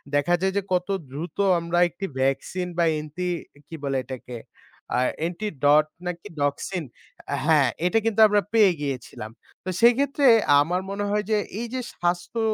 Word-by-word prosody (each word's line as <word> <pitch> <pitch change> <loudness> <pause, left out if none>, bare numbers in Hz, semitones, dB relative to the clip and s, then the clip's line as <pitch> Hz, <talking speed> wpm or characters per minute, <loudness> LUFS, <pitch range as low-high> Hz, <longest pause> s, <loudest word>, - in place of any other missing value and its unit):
দেখা 145 +4 +2
যায় 190 0 +1
যে - - +2
কত 180 0 +1 0.2
দ্রুত 155 +6 -7 0.2
আমরা 170 +1 -2
একটি 185 +3 -6
ভ্যাকসিন 135 +7 -1
বা, 170 - +3 0.2
এন্টি 155 +4 -5 0.4
কি 165 - -8
বলে 135 -1 -1
এটাকে 125 -1 -7 0.6
আ - - +3 0.2
অ্যান্টি 170 +6 -3 0.2
ডট 150 +1 +6 0.2
নাকি 180 +3 -5
ডক্সিন 145 +5 -1 0.6
হ্যাঁ, 150 -5 +4 0.2
এটা 180 +5 +2
কিন্তু 225 -1 0
আমরা 205 0 +2
পেয়ে 215 -4 +6
গিয়েছিলাম। 130 -6 -5 0.3
তো - - -5
সেক্ষেত্রে 275 +4 +4 0.3
আমার 175 +5 0
মনে 200 +1 -3
হয় 210 0 +1
যে 215 - +4 0.2
এই 235 - -3
যে 260 - -2
স্বাস্থ্য 175 +6 -2
175 Hz, 160 wpm, -24 LUFS, 145-205 Hz, 0.6 s, ডট